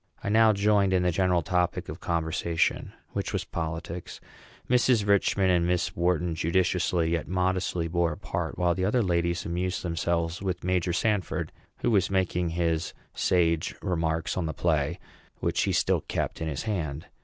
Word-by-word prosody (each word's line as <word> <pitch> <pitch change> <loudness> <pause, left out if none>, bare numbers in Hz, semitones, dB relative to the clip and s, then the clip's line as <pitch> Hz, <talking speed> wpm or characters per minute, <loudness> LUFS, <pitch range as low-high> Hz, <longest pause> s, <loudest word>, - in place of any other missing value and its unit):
I - - -1
now 110 +1 +6
joined 100 -1 +3
in 90 -1 +3
the 90 - +2
general 90 -1 +2
topic 90 +1 0
of - - -7
conversation, 85 0 0 0.2
which - - -3
was - - -1
politics; 85 +1 -5 0.5
Mrs. 125 -3 +3
Richman 100 -1 +3
and 85 -1 +2
Miss 90 0 0
Wharton 85 0 +1
judiciously, 85 0 +1
yet 85 -2 -1
modestly, 90 -1 0
bore 85 0 +1
a - - -10
part; - - -4
while 90 -1 +2
the 95 +1 -2
other 110 +5 +2
ladies 85 -1 0
amused 90 +2 -2
themselves 85 0 -1
with 90 -2 -3
Major 90 -1 +1
Sanford, 105 +1 -1 0.3
who - - +2
was 100 -3 +3
making 90 -2 0
his 85 -1 -1 0.2
sage 85 -2 +1
remarks 80 -4 -1
on 85 -3 -1
the 80 - -4
play, 80 -1 0 0.4
which - - 0
he - - 0
still - - +2
kept - - -3
in 80 - -1
his 75 -4 -3
hand. 80 -9 -3
90 Hz, 165 wpm, -27 LUFS, 85-95 Hz, 0.5 s, now